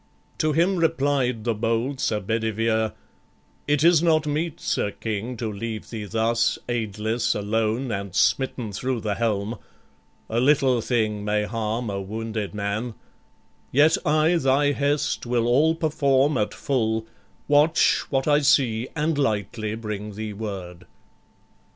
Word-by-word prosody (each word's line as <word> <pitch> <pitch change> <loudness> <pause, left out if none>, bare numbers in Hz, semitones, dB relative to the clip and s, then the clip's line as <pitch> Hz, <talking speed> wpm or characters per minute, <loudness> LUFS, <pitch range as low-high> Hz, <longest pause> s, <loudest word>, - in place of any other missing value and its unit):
To 155 - +2
him 175 +5 +2
replied 140 -8 +1
the 115 0 +1
bold 115 +5 -1
Sir 105 -4 0
Bedivere: 110 +1 0 0.7
"It 145 0 +2
is 170 -2 +6
not 160 -2 +3
meet, 155 +2 -2
Sir - - -1
King, 110 +3 -4
to 110 -2 -3
leave 110 +1 -6
thee 110 -3 -5
thus, 115 +2 +1
Aidless, 110 -1 -1
alone, 110 +4 -1
and 100 -2 -4
smitten 125 -1 +1
thro' 125 +5 -2
the 105 -1 -2
helm 110 0 -1 0.7
A 115 - -1
little 130 -2 +3
thing 110 -4 0
may 105 0 0
harm 110 +1 -2
a 100 0 -3
wounded 110 +1 -4
man: 105 +3 -3 0.8
Yet 150 +4 +5
I 155 +3 +3
thy 145 -1 +3
hest 140 -2 -1
will 120 -1 +1
all 145 +7 +3
perform 145 -3 +2
at 105 -3 -1
full, 110 -5 -1 0.4
Watch 150 +2 +4
what 135 0 0
I 145 0 +5
see, 125 -5 +2
and 155 -1 0
lightly 110 -3 -1
bring 105 -2 -6
thee 110 0 -5
word." 95 -5 -7
115 Hz, 140 wpm, -24 LUFS, 105-140 Hz, 0.8 s, is